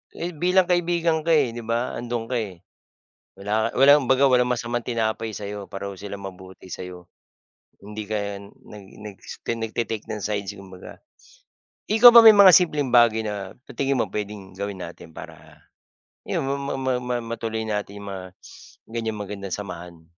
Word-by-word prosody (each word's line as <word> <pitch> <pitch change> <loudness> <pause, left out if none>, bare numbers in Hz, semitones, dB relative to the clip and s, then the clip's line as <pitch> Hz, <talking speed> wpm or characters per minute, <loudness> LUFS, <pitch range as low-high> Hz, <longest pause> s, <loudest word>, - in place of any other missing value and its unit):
Eh, 175 +1 -4
bilang 180 +4 +3
kaibigan 170 -2 +1
ka, 165 +1 +2
eh, 135 -6 +2
'di 120 - -7
ba? 115 +2 -2
'Andoon 120 -1 -4
ka, 125 - +1
eh. 95 -6 -7 0.7
Wala 105 +3 0
ka - - -9
walang 140 -1 +6
baga 130 +1 +5
walang 125 -2 +3
masamang 120 0 -2
tinapay 110 -2 -2
sa'yo 100 -1 -7
pareho 100 0 -6
sila 100 +1 -7
mabuti 95 -1 -11
sa'yo. 90 -1 -8 0.7
Hindi 105 +2 -7
ka 100 -2 -3
nag 100 0 -14 0.2
nag 105 -2 -9
s - - -9
tine 115 -1 -2
nagta-take 110 -1 -3
ng 105 - -4
sides 100 -2 -2
kumbaga. 95 -2 -12 0.9
Ikaw 225 +3 +9
ba 235 - +11
may 220 - +11
mga 190 -3 +9
simpleng 150 -6 +3
bagay 120 -2 +5
na 100 -2 -5 0.2
sa - - -9
tingin 135 -1 +1
mo - - +1
puwedeng 105 -2 -6
gawin 100 -1 -5
natin 85 0 -12
para - - -12 0.6
'yon - - -2
ma 140 - 0 0.2
ma 130 0 0
ma 125 0 -2
matuloy 115 -1 -4
natin 105 -1 -3
'yong 100 - -10
mga 95 -1 -6 0.7
ganyang 110 -2 -4
magandang 100 -1 -6
samahan? 85 -4 -9
110 Hz, 170 wpm, -23 LUFS, 100-125 Hz, 0.9 s, ba